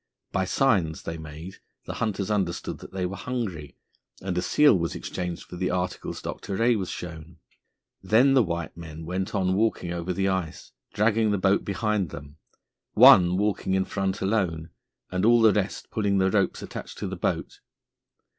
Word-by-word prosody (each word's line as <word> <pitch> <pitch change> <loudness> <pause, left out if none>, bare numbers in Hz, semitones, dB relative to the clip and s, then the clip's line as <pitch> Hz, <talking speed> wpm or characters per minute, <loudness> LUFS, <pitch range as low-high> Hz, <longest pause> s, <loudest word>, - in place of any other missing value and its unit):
By 95 - 0
signs 95 -8 +1
they 80 0 -5
made 80 +4 -9 0.3
the - - -5
hunters 105 -3 -1
understand 95 -5 -2
that - - -11
they 95 -1 -2
were 95 +2 -4
hungry, 100 - -5 0.4
and 95 -1 -4
a 90 - +1
seal 145 +6 +5
was 85 -2 -1
exchanged 90 -1 -5
for 90 - -10
the 90 0 -1
articles 90 0 -3
Dr. 95 - -5
Rae 115 +3 +3
was 95 -4 -3
shown. 80 -1 -8 0.6
Then 115 +8 +4
the 135 - +6
white 85 -6 -3
men 80 -1 -9
went 95 +4 -3
on 95 -2 +1
walking 95 -4 0
over 85 +1 -3
the 95 +1 0
ice, 95 -4 -3 0.2
dragging 110 +1 +2
the 100 - +1
boat 95 +1 +2
behind 100 -2 -1
them, 70 +1 -10 0.6
one 90 0 +7
walking 100 -2 0
in 95 0 +1
front 95 -1 -2
alone, 90 -6 -1 0.4
and 90 0 -1
all 120 +2 +6
the 110 -2 +6
rest 100 -1 -2
pulling 100 -2 +1
the 95 0 +2
ropes 100 -2 0
attached - - -8
to - - -4
the - - -4
boat. - - -3
95 Hz, 175 wpm, -26 LUFS, 85-105 Hz, 0.6 s, one